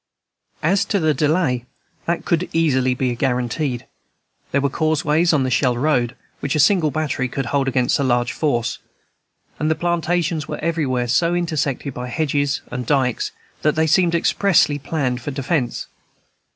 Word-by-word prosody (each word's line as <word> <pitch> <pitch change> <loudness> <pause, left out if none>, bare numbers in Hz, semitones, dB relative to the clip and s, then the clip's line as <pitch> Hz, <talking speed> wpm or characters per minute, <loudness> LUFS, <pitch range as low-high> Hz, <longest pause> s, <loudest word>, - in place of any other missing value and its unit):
As 185 +5 +3
to 200 - 0
the 155 -2 +2
delay, 145 -4 +1 0.4
that 170 0 -1
could 170 - +2
be 180 - -5
easily 130 -6 +2
guaranteed. 125 +1 -1 0.7
There 140 - +2
were 140 - +1
causeways 155 +2 +2
on 145 -4 +2
the 130 - -1
Shell 125 -2 +2
Road 125 -3 +1 0.2
which 140 +2 -2
a - - +1
single 160 +1 +4
battery 145 -4 -1
could 135 +1 -3
hold 135 +2 0
against 125 0 +1
a - - +1
large 120 -2 +1
force; 120 -6 -1 0.8
and 155 - +1
the 160 - +2
plantations 170 -2 0
were - - -4
everywhere 145 -7 -1
so 170 +8 +2
intersected 150 -5 -1
by 125 0 -5
hedges 145 +1 0
and 125 0 -3
dikes 130 -4 +1 0.3
that 150 - +2
they 160 0 +2
seemed 170 +2 +3
expressly 170 -4 +3
planned 135 -4 -2
for 145 - -5
defence. 135 -2 -1
145 Hz, 160 wpm, -21 LUFS, 125-160 Hz, 0.8 s, single